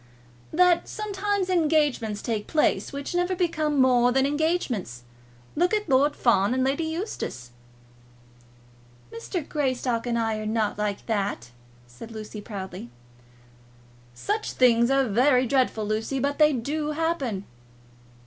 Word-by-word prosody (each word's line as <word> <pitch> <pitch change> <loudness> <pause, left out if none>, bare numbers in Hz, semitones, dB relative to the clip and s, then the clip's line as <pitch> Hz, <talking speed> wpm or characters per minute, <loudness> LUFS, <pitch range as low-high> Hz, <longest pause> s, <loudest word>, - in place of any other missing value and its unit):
"That 355 +1 +3
sometimes 410 -2 -2
engagements 300 - +1
take 220 -3 -2
place 310 - +1
which 280 +2 -5
never 355 +1 0
become 315 -5 0
more 250 -1 +4
than 265 +1 +2
engagements. 280 - -1 0.5
Look 355 +6 +2
at 420 -2 -2
Lord 285 +1 +3
Fawn 215 -1 +2
and 260 - +1
Lady 275 +5 0
Eustace." 320 - -5 1.6
"Mr. 295 - -5
Greystock 255 -5 -1
and 235 -1 0
I 225 -1 0
are 215 - -4
not 215 -1 -1
like 205 -1 -2
that," 200 - -2 0.3
said 120 - -12
Lucy, 215 -1 -8
proudly. 190 - -7 1.3
"Such 420 - -2
things 235 -1 +4
are 270 -1 +2
very 250 +4 +3
dreadful, 250 -4 +1
Lucy, 220 +5 -2
but 280 +3 -1
they 305 0 +6
do 295 +4 -2
happen." 290 - -2
260 Hz, 130 wpm, -25 LUFS, 220-315 Hz, 1.6 s, they